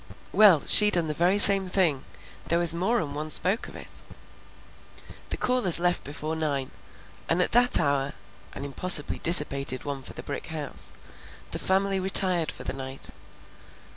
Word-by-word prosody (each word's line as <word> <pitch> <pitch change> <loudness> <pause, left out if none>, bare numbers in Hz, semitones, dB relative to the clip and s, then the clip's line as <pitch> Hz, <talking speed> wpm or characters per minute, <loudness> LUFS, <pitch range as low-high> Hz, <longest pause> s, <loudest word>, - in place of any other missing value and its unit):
Well, 195 -7 +3
she 210 -1 +8
done 175 -5 +1
the 155 - -6
very 175 +5 -1
same 195 -2 +5
thing; 175 -8 -2 0.4
there 170 - -2
was 170 -1 +4
more'n 175 -3 -4
one 155 +2 -8
spoke 190 +7 -1
of - - -16
it." - - -13 1.3
The - - -7
callers 250 -9 +2
left 175 +1 -2
before 150 +3 -8
nine, 145 -4 -6 0.6
and 165 - -1
at 180 - -2
that 245 +1 +2
hour 140 -1 -3 0.4
(an 140 - -8
impossibly 145 +2 +4
dissipated 140 -6 +2
one 140 -2 -8
for - - -12
the - - -11
brick 140 - -9
house) 155 -3 -5 0.6
the - - -6
family 195 +1 -3
retired 185 -3 +1
for - - -12
the - - -7
night. 135 0 -8
170 Hz, 160 wpm, -23 LUFS, 145-190 Hz, 1.3 s, she